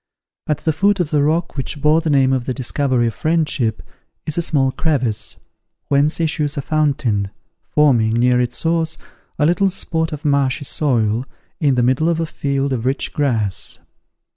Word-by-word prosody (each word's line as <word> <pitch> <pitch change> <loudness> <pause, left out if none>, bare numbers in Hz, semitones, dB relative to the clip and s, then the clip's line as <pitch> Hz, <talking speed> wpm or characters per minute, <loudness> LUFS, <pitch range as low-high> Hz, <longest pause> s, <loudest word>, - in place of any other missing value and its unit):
At 150 - +1
the 160 - 0
foot 200 +5 +2
of 170 -4 -1
the 150 -2 +2
rock 165 +4 0
which 145 +2 -4
bore 150 +3 +3
the 160 - -2
name 135 -2 +3
of 130 -2 -1
The 130 - -2
Discovery 130 -1 0
of 115 - -1
Friendship, 155 -8 0 0.4
is 155 - -2
a 170 - +1
small 135 -5 +1
crevice, 130 -8 -2 0.5
whence 145 +3 +2
issues 150 -3 0
a 140 - -2
fountain, 140 -11 0 0.3
forming, 120 -7 +2
near 125 +1 +3
its 120 -1 -2
source, 165 +1 0 0.4
a 150 - +2
little 185 +4 +3
spot 160 -3 -2
of 150 0 -7
marshy 140 -1 +1
soil 120 -5 +1 0.3
in 140 -4 +2
the 125 - +2
middle 130 +7 +2
of 165 -1 0
a 165 - 0
field 140 -3 -2
of 120 -3 -2
rich 135 +2 -1
grass. 115 -9 -1
140 Hz, 175 wpm, -19 LUFS, 125-155 Hz, 0.5 s, bore